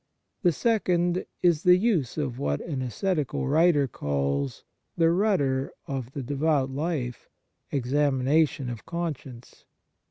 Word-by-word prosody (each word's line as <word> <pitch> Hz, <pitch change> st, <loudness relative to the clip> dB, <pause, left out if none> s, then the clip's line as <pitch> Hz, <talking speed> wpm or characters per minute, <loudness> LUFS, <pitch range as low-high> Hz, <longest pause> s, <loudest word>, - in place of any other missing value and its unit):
The 180 Hz, -5 st, +4 dB
second 180 Hz, -, +1 dB, 0.2 s
is 170 Hz, -4 st, +4 dB
the 180 Hz, 0 st, +6 dB
use 180 Hz, -, 0 dB
of 130 Hz, -5 st, -2 dB
what 70 Hz, 0 st, -1 dB
an 140 Hz, -5 st, -4 dB
ascetical 150 Hz, -, -1 dB
writer 150 Hz, -1 st, +4 dB
calls 70 Hz, -, -2 dB, 0.2 s
" -, -, -49 dB
the 165 Hz, -1 st, +4 dB
rudder 170 Hz, -9 st, +1 dB
of 130 Hz, -2 st, -5 dB
the 140 Hz, -, -4 dB
devout 140 Hz, 0 st, +1 dB
life, 140 Hz, -4 st, -3 dB, 0.4 s
examination 140 Hz, +1 st, +1 dB
of 115 Hz, -3 st, -8 dB
conscience." 150 Hz, -8 st, -6 dB
145 Hz, 125 wpm, -26 LUFS, 130-170 Hz, 0.4 s, the